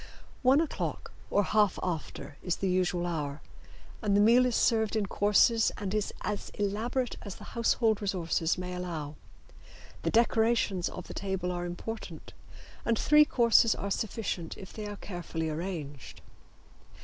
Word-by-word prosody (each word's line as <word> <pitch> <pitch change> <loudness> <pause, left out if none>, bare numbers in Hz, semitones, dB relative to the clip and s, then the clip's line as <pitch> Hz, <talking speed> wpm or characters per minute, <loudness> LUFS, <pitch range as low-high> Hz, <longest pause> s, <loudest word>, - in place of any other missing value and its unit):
One 265 +2 +5
o'clock 325 -2 -3 0.2
or 205 - +3
half 210 0 +2
after 165 -4 -4
is 180 - -1
the 195 - -2
usual 180 -1 +1
hour, 150 -4 -3 0.6
and 205 -3 +2
the - - +4
meal 235 +4 +6
is 245 - -1
served 220 -2 +2
in 215 -2 +1
courses 210 +3 +3
and 200 -2 -3
is 215 -1 0
as 210 -1 -3
elaborate 225 +5 -1
as 200 -3 -7
the - - -12
household 230 -2 +2
resources 170 -4 0
may 180 0 -5
allow. 165 -5 -4 0.9
The - - 0
decorations 225 -5 +2
of 180 - -8
the - - -7
table 190 -2 -2
are 175 0 -3
important, 220 +6 -7 0.5
and 230 -1 +1
three 300 +4 +6
courses 235 -4 +4
are 200 - -4
sufficient 195 -6 -3
if 190 - -10
they 215 -1 -6
are 205 - -5
carefully 175 -4 -4
arranged. 155 -5 -6
200 Hz, 150 wpm, -30 LUFS, 175-225 Hz, 0.9 s, meal